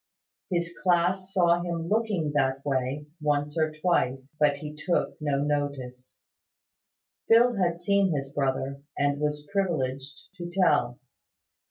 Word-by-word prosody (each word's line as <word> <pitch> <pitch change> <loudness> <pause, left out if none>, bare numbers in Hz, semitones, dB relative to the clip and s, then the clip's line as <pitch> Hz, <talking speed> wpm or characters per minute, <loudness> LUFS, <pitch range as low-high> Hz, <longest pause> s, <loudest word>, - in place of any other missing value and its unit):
His 170 -2 -1
class 185 +1 +1
saw 175 -3 +3
him 170 -1 -3
looking 210 -7 0
that 135 -1 0
way, 135 +1 -1 0.2
once 150 0 0
or 155 -1 +1
twice; 155 -5 0
but 145 -1 +3
he 150 +1 -7
took 170 +3 -1
no 145 -2 0
notice. 140 -4 -3 1.1
Phil 240 +2 +6
had 170 -3 +1
seen 195 +1 +2
his 135 -2 -3
brother, 135 0 -1 0.2
and 145 0 +1
was 150 0 -2
privileged 140 -8 -1 0.2
to 175 -1 -6
tell. 145 -10 +2
150 Hz, 130 wpm, -27 LUFS, 140-175 Hz, 1.1 s, Phil